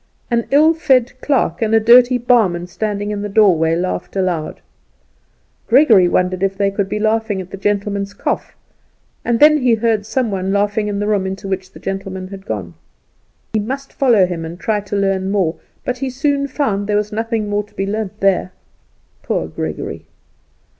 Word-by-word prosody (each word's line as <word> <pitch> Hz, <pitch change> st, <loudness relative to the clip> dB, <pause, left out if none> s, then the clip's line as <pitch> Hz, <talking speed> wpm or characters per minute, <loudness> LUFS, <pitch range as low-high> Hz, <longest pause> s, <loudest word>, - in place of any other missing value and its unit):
An 235 Hz, -1 st, +1 dB
ill 305 Hz, +3 st, +5 dB
fed 265 Hz, -7 st, +2 dB
clerk 245 Hz, -, 0 dB
and 225 Hz, 0 st, +2 dB
a -, -, +6 dB
dirty 245 Hz, +3 st, +6 dB
barman 220 Hz, -8 st, +2 dB
standing 205 Hz, +3 st, -3 dB
in 205 Hz, -1 st, -3 dB
the 205 Hz, -, -4 dB
doorway 180 Hz, -6 st, +3 dB
laughed 185 Hz, +3 st, -3 dB
aloud. 180 Hz, -5 st, -2 dB, 1.1 s
Gregory 230 Hz, -8 st, +6 dB
wondered 180 Hz, +1 st, 0 dB
if 195 Hz, 0 st, 0 dB
they 200 Hz, 0 st, +1 dB
could 195 Hz, -1 st, -2 dB
be 210 Hz, -, -2 dB
laughing 220 Hz, -1 st, 0 dB
at 185 Hz, -1 st, -8 dB
the -, -, -5 dB
gentleman's 200 Hz, 0 st, -2 dB
cough, -, -, -3 dB, 0.7 s
and 235 Hz, -1 st, 0 dB
then 305 Hz, 0 st, +6 dB
he 250 Hz, -3 st, +3 dB
heard 220 Hz, -2 st, 0 dB
some 240 Hz, -1 st, -1 dB
one 190 Hz, 0 st, -2 dB
laughing 205 Hz, +1 st, 0 dB
in 205 Hz, -1 st, -2 dB
the 205 Hz, -, -1 dB
room 205 Hz, -3 st, 0 dB
into 190 Hz, +1 st, -5 dB
which 190 Hz, -1 st, -4 dB
the -, -, -13 dB
gentleman 195 Hz, -1 st, -5 dB
had 195 Hz, -1 st, -10 dB
gone. 95 Hz, -6 st, -4 dB, 0.8 s
He 215 Hz, -, +2 dB
must 270 Hz, +6 st, -5 dB
follow 235 Hz, -8 st, +4 dB
him 175 Hz, -2 st, -4 dB
and 165 Hz, +2 st, -7 dB
try 215 Hz, 0 st, 0 dB
to 205 Hz, 0 st, -6 dB
learn 195 Hz, -1 st, 0 dB
more; 190 Hz, -5 st, 0 dB, 0.3 s
but 250 Hz, -, -2 dB
he 270 Hz, -, -2 dB
soon 280 Hz, +2 st, 0 dB
found 260 Hz, -8 st, -1 dB
that -, -, -5 dB
there 210 Hz, -1 st, +1 dB
was 210 Hz, 0 st, -2 dB
nothing 225 Hz, 0 st, -2 dB
more 205 Hz, 0 st, 0 dB
to 205 Hz, -, -24 dB
be 195 Hz, -, -2 dB
learnt 210 Hz, 0 st, -4 dB
there. 190 Hz, -2 st, +1 dB, 0.7 s
Poor -, -, -2 dB
Gregory! -, -, -5 dB
205 Hz, 190 wpm, -18 LUFS, 190-230 Hz, 1.1 s, a